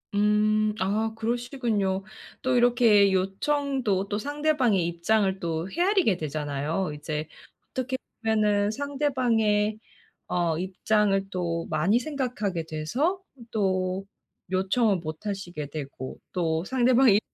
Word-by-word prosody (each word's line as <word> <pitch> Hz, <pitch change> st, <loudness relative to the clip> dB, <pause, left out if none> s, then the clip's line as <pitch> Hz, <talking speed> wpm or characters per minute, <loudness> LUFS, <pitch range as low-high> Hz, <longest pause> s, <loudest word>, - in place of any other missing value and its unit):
음. 210 Hz, +1 st, +3 dB
아, 215 Hz, +4 st, 0 dB
그러시군요. 225 Hz, -4 st, -1 dB, 0.4 s
또 255 Hz, 0 st, +1 dB
이렇게 235 Hz, -5 st, +5 dB
요청도 200 Hz, +1 st, 0 dB
또 205 Hz, -, -1 dB
상대방의 280 Hz, -, +1 dB
입장을 190 Hz, +3 st, +1 dB
또 165 Hz, +1 st, -2 dB
헤아리게 355 Hz, -, +2 dB
되잖아요. 150 Hz, +3 st, -2 dB
이제 150 Hz, +1 st, -4 dB, 0.4 s
어떻게 260 Hz, 0 st, -2 dB, 0.2 s
보면은 210 Hz, -2 st, +2 dB
상대방의 235 Hz, -7 st, +1 dB, 0.5 s
어 170 Hz, -3 st, 0 dB
입장을 195 Hz, +1 st, +1 dB
또 170 Hz, -3 st, -2 dB
많이 175 Hz, +9 st, +2 dB
생각하게 240 Hz, -, -2 dB
돼서 240 Hz, -, -1 dB, 0.3 s
또 190 Hz, -2 st, 0 dB, 0.5 s
요청을 195 Hz, +3 st, +2 dB
못 155 Hz, +2 st, -7 dB
하시게 175 Hz, -7 st, -4 dB
되고, 135 Hz, -3 st, -6 dB
또 165 Hz, -2 st, 0 dB
상대방이 250 Hz, -3 st, +4 dB
205 Hz, 245 characters per minute, -26 LUFS, 180-240 Hz, 0.5 s, 이렇게